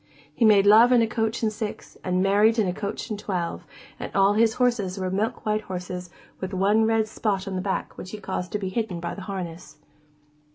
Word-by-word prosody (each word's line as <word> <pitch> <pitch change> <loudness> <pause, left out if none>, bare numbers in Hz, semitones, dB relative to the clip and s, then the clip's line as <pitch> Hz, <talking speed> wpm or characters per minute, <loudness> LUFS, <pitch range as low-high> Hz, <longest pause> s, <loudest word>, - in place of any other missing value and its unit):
He 230 - +2
made 205 -2 +6
love 220 +4 +7
in 240 -2 +5
a - - +1
coach 225 0 -2
and 215 -1 +1
six, 215 -1 -6
and 185 0 +1
married 210 +4 +4
in 215 -4 +2
a 180 - -1
coach 200 +3 -5
and 210 - -3
twelve, 180 -5 -3 0.3
and - - -5
all 195 +1 +5
his 225 +1 +3
horses 230 -7 0
were 185 -1 -2
milk 210 +4 -2
white 215 0 +1
horses 180 -2 -6 0.3
with 190 0 -4
one 205 +4 +3
red 225 -1 +2
spot 205 -3 -2
on 195 - -4
the 185 - -2
back 190 0 -3
which 185 - -7
he 215 - -6
caused 190 -3 -4
to - - +1
be 195 -2 -3
hidden 195 -4 -2
by 170 0 -4
the 200 - -8
harness. 175 -5 -7
200 Hz, 220 wpm, -25 LUFS, 185-220 Hz, 0.3 s, love